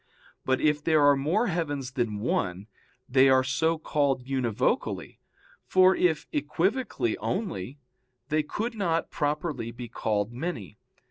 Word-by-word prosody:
But 130 0 +2
if 150 -1 +1
there 155 -3 +4
are 145 0 +6
more 160 - +1
heavens 145 - -2
than 115 -5 -2
one, 95 -4 -1 0.4
they 135 +1 +5
are 130 0 +5
so 155 +5 +1
called 140 -5 0
univocally, 130 -5 -1 0.5
for 185 0 +5
if 160 -4 +1
equivocally 155 - -1
only, 125 - -3 0.5
they 155 0 +2
could 220 +10 -4
not 170 -6 -1
properly 150 -4 -2
be 120 +1 -8
called 110 -1 -2
many. 120 - -5
145 Hz, 130 wpm, -27 LUFS, 125-165 Hz, 0.5 s, are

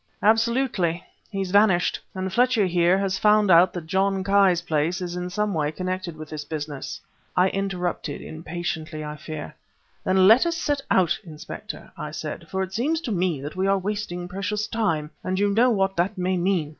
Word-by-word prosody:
"Absolutely! 220 -6 +2 0.3
He's 195 -3 -3
vanished! 200 -3 +4 0.2
And 190 0 -3
Fletcher 245 -2 +3
here 175 0 +3
has 195 -1 -1
found 210 -2 +4
out 175 +2 +7
that 175 -3 -5
John 190 +2 +1
Ki's 195 -3 +4
place 160 +3 0
is 180 -1 -4
in 180 0 -3
some 210 +2 -1
way 150 -2 0
connected 185 -1 -4
with 155 0 -8
this 155 -1 -6
business." 150 -2 -5 0.4
I 185 +1 +5
interrupted 180 -6 -2
impatiently, 160 -1 -5
I 150 0 -5
fear. 150 +1 -7 0.5
"Then 185 0 +4
let 235 - +7
us 335 -1 -1
set 290 -3 -1
out, 175 -3 +3
Inspector," 155 -5 -9
I - - -5
said, - - -6
"for 190 0 -1
it 190 0 -7
seems 290 +10 0
to 250 - -4
me 175 -7 0
that 145 +2 -6
we 190 +1 0
are 195 0 +3
wasting 190 -3 -3
precious 200 +3 -2
time 165 -10 -1
and 185 0 -1
you 200 +1 +2
know 240 +4 +5
what 195 -4 +1
that 185 +4 0
may 185 +1 0
mean." 175 -4 +1
185 Hz, 185 wpm, -24 LUFS, 170-200 Hz, 0.5 s, out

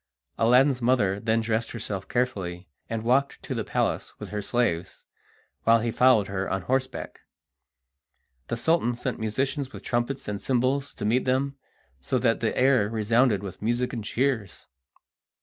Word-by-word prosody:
Aladdin's 125 +3 +4
mother 115 -6 +2
then 110 +1 +1
dressed 115 0 -1
herself 100 -4 -4
carefully, 95 -8 -2 0.2
and 115 -1 -3
walked 130 +4 +2
to - - -4
the - - -2
palace - - -2
with - - -7
her 105 0 -3
slaves, 100 -6 -1 0.6
while 115 0 +5
he 115 +1 -1
followed 120 -5 +4
her 95 -1 -3
on 95 - -2
horseback. 130 0 -2 1.3
The 120 - -2
Sultan 120 -1 +2
sent 125 0 -3
musicians 130 +5 -1
with - - -10
trumpets 120 +3 -2
and 105 -1 -3
cymbals 135 +2 0
to - - -4
meet 120 +5 +2
them, 135 +2 0 0.4
so 65 - -1
that 115 -2 +2
the 115 - -1
air 125 -5 +4
resounded 115 -1 +2
with 95 - -8
music 120 +3 0
and 115 -3 -4
cheers. 120 - -1
120 Hz, 155 wpm, -26 LUFS, 105-130 Hz, 1.3 s, while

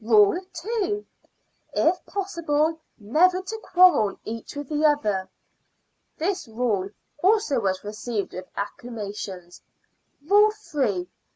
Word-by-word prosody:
"Rule 215 - +5
Two. 415 +2 -2 0.7
If 350 +3 +2
possible, 325 -5 0 0.2
never 330 - +3
to 385 +4 -5
quarrel 360 - +4
each 230 +5 -6
with 290 -1 -5
the 300 0 0
other." 215 -11 +2 0.9
This 360 -2 -1
rule 220 -4 -1 0.3
also 390 - +3
was 190 -3 -1
received 210 0 -4
with 185 0 -7
acclamations. 200 -4 -6 0.6
_"Rule 415 +5 +6
Three. 260 - -1
290 Hz, 105 wpm, -25 LUFS, -, 0.9 s, Rule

